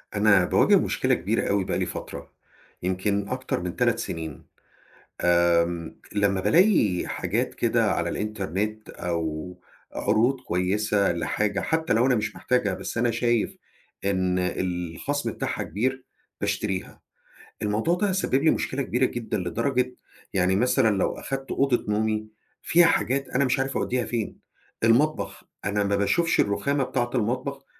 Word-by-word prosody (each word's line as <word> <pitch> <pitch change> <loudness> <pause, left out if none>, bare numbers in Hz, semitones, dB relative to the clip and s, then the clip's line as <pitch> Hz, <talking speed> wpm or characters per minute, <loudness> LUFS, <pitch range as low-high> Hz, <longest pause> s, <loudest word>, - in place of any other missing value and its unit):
أنا 100 -3 +5
باواجه - - +4
مشكلة - - +1
كبيرة - - 0
أوي 100 -1 +2
بقى - - -1
لي - - 0
فترة، - - -7 0.5
يمكن 100 +2 0
أكتر 130 +1 -2
من 90 -1 -4
3 - - +2
سنين. 80 -3 -5 0.8
امم، 85 -1 +2 0.2
لمّا 100 -2 +1
بالاقي 105 - +3
حاجات - - -2
كده - - +2
على - - -1
الإنترنت 105 +1 -3
أو 85 0 -4 0.3
عروض 120 +5 +1
كويسة 100 +1 +1
لحاجة 100 +4 -1
حتى 160 0 0
لو 115 +3 +3
أنا 130 - +4
مش 105 -2 -2
محتاجها 110 -6 +1
بس - - -5
أنا 120 +1 +2
شايف 115 -1 0 0.5
إن 95 -2 +1
الخصم 90 - -2
بتاعها - - -3
كبير، 130 +7 -2 0.4
باشتريها. 95 -3 -2 0.6
الموضوع 105 +11 +1
ده 200 +1 +1
سبب 190 -7 -1
لي 160 - +5
مشكلة 135 +1 -1
كبيرة 125 0 +1
جدًا 115 -3 -3
لدرجة 125 +9 -1 0.4
يعني 95 0 +2
مثلًا 120 -1 +3
لو - - +1
أخدت 135 0 -5
أوضة 135 -3 +1
نومي 110 +1 0 0.4
فيها 175 0 +5
حاجات 135 -3 +1
أنا 140 +2 +1
مش 130 +1 +1
عارف 135 +1 -1
أوديها 125 -1 0
فين، 115 -3 -3 0.5
المطبخ 140 +8 +2 0.2
أنا 100 0 0
ما 100 0 +1
باشوفش 165 - +2
الرخامة 140 +7 +1
بتاعت 120 -1 -2
المطبخ 130 +4 -1
110 Hz, 140 wpm, -25 LUFS, 95-130 Hz, 0.8 s, أنا